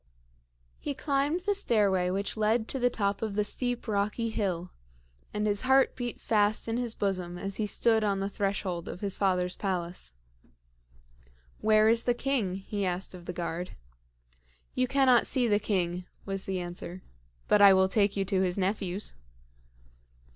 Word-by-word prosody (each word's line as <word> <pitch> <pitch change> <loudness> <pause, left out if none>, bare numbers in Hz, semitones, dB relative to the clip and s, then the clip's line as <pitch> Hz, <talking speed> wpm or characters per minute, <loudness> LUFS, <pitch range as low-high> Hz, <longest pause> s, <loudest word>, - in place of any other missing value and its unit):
He 285 - -4
climbed 285 +4 0
the 410 +3 +1
stairway 200 - +2
which 195 +2 -2
led 220 +1 +1
to 265 - -2
the 245 0 +3
top 200 -3 -1
of 220 -2 -2
the 210 - +2
steep, 245 +3 -2
rocky 210 +2 -1
hill, 180 -5 -2 0.6
and 210 0 -1
his 205 -1 +1
heart 265 +1 +4
beat 245 -2 -4
fast 210 0 +2
in 225 +1 -1
his 240 -2 -2
bosom 180 -3 -2
as 195 +2 -3
he 215 - -1
stood 225 +1 +2
on 200 -2 +1
the 195 - -1
threshold 195 -4 -2
of 180 - -7
his 200 -2 -2
father's 180 -2 +1
palace. 175 - -3 1.5
"Where 215 0 +4
is 230 +1 +3
the 245 - +2
king?" 240 -8 -1
he 200 +1 -4
asked 185 +1 -1
of 180 -1 -11
the - - -4
guard. 175 0 -4 1.0
"You 255 0 +1
cannot 265 -2 +4
see 250 -2 +2
the 205 -2 +3
king," 180 -4 -1 0.2
was 195 -1 -4
the 190 -1 -2
answer; 175 +1 -6 0.4
"but 210 - +4
I 200 -1 +10
will 190 0 +5
take 200 0 +1
you 195 - +1
to 190 -1 +1
his 180 -1 0
nephews." 195 0 -2
205 Hz, 170 wpm, -29 LUFS, 185-230 Hz, 1.5 s, I